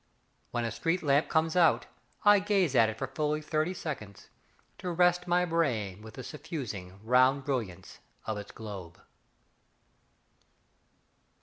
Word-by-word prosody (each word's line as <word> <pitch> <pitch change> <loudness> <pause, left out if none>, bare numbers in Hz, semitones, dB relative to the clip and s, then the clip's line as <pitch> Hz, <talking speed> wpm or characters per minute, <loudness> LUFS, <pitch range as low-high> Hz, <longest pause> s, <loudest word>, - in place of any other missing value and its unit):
When 120 -1 -2
a 115 - -2
street 165 - -1
lamp 145 0 +3
comes 160 +1 +1
out, 170 -3 +4 0.4
I 205 0 +8
gaze 195 -7 +1
at 115 -4 +5
it 110 - -6
for 135 - -2
fully 150 +3 -1
thirty 155 +3 -1
seconds 110 - -7 0.5
To 180 - -4
rest 180 +1 +3
my 175 +1 +3
brain 120 - -1
with 110 0 -11
the 130 - -7
suffusing, 120 - -6
round 130 +4 +4
brilliance 105 -10 -4 0.3
of 110 - -2
its 100 - -9
globe. 100 -6 -9
140 Hz, 135 wpm, -30 LUFS, 110-165 Hz, 0.5 s, I